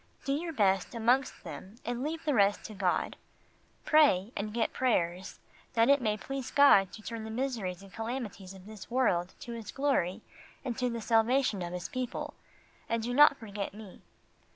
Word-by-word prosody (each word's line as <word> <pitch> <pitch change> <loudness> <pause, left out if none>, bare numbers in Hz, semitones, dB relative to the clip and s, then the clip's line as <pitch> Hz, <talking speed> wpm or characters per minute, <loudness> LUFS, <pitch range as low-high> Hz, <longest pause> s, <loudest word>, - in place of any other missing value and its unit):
Do 275 - +1
your 330 +4 -2
best 195 - +1
amongst 245 +4 +1
them, 195 +4 -9
and 240 +1 -3
leave 320 +4 -4
the 295 - +2
rest 200 -3 +3
to 215 - -8
God. 190 -3 -1 0.7
Pray, 260 -10 +4
and 210 +1 -3
get 225 +1 -1
prayers, 185 -8 0 0.4
that 230 +2 +3
it 280 -1 +5
may 215 -3 0
please 270 +2 -5
God 240 -10 +6
to 215 - -10
turn 230 0 -5
the 220 - -6
miseries 220 -7 -3
and 195 - -15
calamities 225 -5 -5
of 190 -1 -14
this 215 -2 -10
world 190 -8 +1
to 240 - -7
His 225 -4 -6
glory 230 -8 0 0.4
and 245 -3 -2
to 250 -1 +1
the 235 -1 -4
salvation 225 -1 +2
of 175 0 -4
His 180 -1 -4
people, 255 -1 -4 0.6
and 230 -1 0
do 245 +2 -2
not 290 +1 +7
forget 205 -3 -6
me. 210 -3 -11
225 Hz, 180 wpm, -30 LUFS, 195-255 Hz, 0.7 s, not